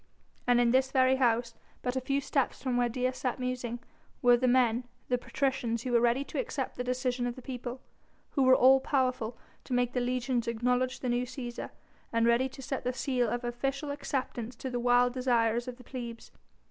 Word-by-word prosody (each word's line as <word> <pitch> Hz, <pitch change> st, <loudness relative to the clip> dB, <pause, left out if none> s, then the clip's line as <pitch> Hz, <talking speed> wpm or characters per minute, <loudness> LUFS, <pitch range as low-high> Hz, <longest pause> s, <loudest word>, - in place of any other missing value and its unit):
And 245 Hz, -1 st, +5 dB
in 240 Hz, -1 st, +4 dB
this 260 Hz, +1 st, +3 dB
very 260 Hz, 0 st, +4 dB
house, 235 Hz, -2 st, +2 dB, 0.3 s
but 250 Hz, 0 st, -1 dB
a 260 Hz, -, 0 dB
few 275 Hz, +2 st, 0 dB
steps 275 Hz, -1 st, -1 dB
from 255 Hz, -2 st, 0 dB
where 245 Hz, 0 st, +2 dB
Dea 255 Hz, +2 st, 0 dB
sat 255 Hz, -1 st, -3 dB
musing, 250 Hz, -2 st, -3 dB, 0.5 s
were 245 Hz, 0 st, +7 dB
the 255 Hz, +1 st, +1 dB
men, 245 Hz, -1 st, +3 dB, 0.2 s
the 250 Hz, -, +2 dB
patricians 245 Hz, -4 st, -1 dB
who 255 Hz, -, -3 dB
were 235 Hz, -1 st, +4 dB
ready 240 Hz, +3 st, +2 dB
to -, -, -5 dB
accept 300 Hz, -, -3 dB
the 250 Hz, -, -3 dB
decision 250 Hz, 0 st, -1 dB
of 240 Hz, -, -4 dB
the 255 Hz, -, -10 dB
people, 250 Hz, 0 st, -6 dB, 0.5 s
who 275 Hz, -, 0 dB
were 260 Hz, 0 st, +7 dB
all 265 Hz, +1 st, +6 dB
powerful 255 Hz, -4 st, 0 dB, 0.3 s
to 255 Hz, -, -5 dB
make 245 Hz, 0 st, +1 dB
the 250 Hz, -, +1 dB
legions 245 Hz, -1 st, -1 dB
acknowledge 250 Hz, +2 st, 0 dB
the 255 Hz, -, -1 dB
new 245 Hz, +1 st, +1 dB
Cæsar, 240 Hz, -2 st, -6 dB, 0.4 s
and 230 Hz, 0 st, +2 dB
ready 235 Hz, +3 st, +3 dB
to 270 Hz, -, -11 dB
set 270 Hz, +1 st, -3 dB
the 250 Hz, -, -1 dB
seal 250 Hz, -2 st, 0 dB
of 240 Hz, +2 st, -2 dB
official 270 Hz, +4 st, -2 dB
acceptance 255 Hz, -4 st, -3 dB
to 260 Hz, +2 st, -5 dB
the 245 Hz, -, -1 dB
wild 245 Hz, 0 st, +4 dB
desires 240 Hz, -2 st, +1 dB
of 250 Hz, -1 st, -6 dB
the 250 Hz, -, -14 dB
plebs. 235 Hz, -2 st, -7 dB
250 Hz, 205 wpm, -30 LUFS, 240-260 Hz, 0.5 s, were